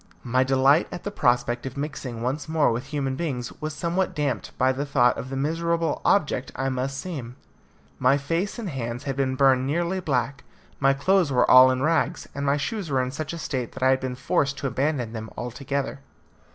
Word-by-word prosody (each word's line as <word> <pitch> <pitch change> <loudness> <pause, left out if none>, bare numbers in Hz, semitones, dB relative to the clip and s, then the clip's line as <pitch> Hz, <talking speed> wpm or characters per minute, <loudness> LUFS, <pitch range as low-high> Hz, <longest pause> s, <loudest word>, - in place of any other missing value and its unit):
My 130 +1 +2
delight 135 +4 +4
at 180 - -7
the 205 - -4
prospect 120 -5 +1
of 130 - -8
mixing 135 -5 -5
once 140 +5 -2
more 155 -5 +3
with 120 +4 -3
human 135 -2 -2
beings 130 -6 -3
was 155 -1 -4
somewhat 175 +5 -1
damped 150 -2 -1
at 130 0 +3
the 140 - -2
thought 130 -4 +3
of 130 - -6
the 135 - -4
miserable 165 +3 0
object 150 -8 +1
I 135 0 -1
must 130 +1 -2
seem. 135 -10 -6 0.6
My 130 +2 +4
face 165 - -2
and 230 -4 -4
hands 120 -1 -4
had 135 -2 -3
been 130 -1 0
burned 130 -1 +4
nearly 170 +5 0
black; 135 -5 -1 0.4
my 135 0 +4
clothes 180 +2 +2
were 125 -2 +3
all 130 0 +9
in 130 +1 0
rags, 165 +1 +1
and 140 - -4
my 140 +1 +3
shoes 190 +4 -3
were 130 -2 +1
in 125 - -3
such 155 +2 -4
a 170 - -5
state 130 -6 -3
that - - -5
I 130 - +5
had 130 - +2
been 130 -1 -4
forced 140 +2 0
to 140 - -6
abandon 135 -4 -1
them 110 -1 -6
altogether. 135 +3 -3
135 Hz, 205 wpm, -25 LUFS, 130-155 Hz, 0.6 s, all